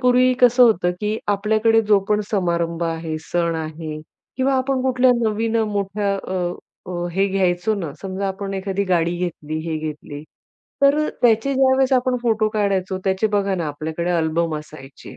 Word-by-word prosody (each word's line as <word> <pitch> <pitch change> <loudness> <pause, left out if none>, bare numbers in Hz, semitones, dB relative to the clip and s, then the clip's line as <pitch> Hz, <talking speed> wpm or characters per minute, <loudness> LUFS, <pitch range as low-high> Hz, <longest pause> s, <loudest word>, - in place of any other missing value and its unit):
पूर्वी 250 0 +4
कसं 245 0 +6
होतं, 180 -7 +4
की 210 +1 -1
आपल्याकडे 215 +2 +3
जो 210 -2 +4
पण 210 0 +2
समारंभ 170 -4 -1
आहे, 165 -1 -3
सण 170 +1 -1
आहे, 155 -1 -5 0.4
किंवा 265 +1 +1
आपण 260 0 0
कुठल्या 255 -1 +3
नवीन 225 +1 0
अ, 225 - +2
मोठ्या 200 -1 -1
अ, 190 - -7 0.6
अ, 175 -1 -3
हे 195 +2 +2
घ्यायचो 190 +1 +1
ना. 165 -8 -4
समजा, 195 0 -3
आपण 195 +1 -4
एखादी 195 +1 -2
गाडी 175 -2 +1
घेतली, 155 -3 -4
हे 160 - -1
घेतली, 150 -1 -6 0.6
तर 295 +2 +4
त्याचे 235 +3 +3
ज्यावेळेस 265 0 +3
आपण 255 0 +2
फोटो 220 -2 +2
काढायचो 195 -3 -1
त्याचे. 190 +2 +1
बघा 200 -2 0
ना, 170 -3 -2
आपल्याकडे 160 +4 -3
अल्बम 165 -1 0
असायचे 150 -3 -12
195 Hz, 160 wpm, -21 LUFS, 170-225 Hz, 0.6 s, कसं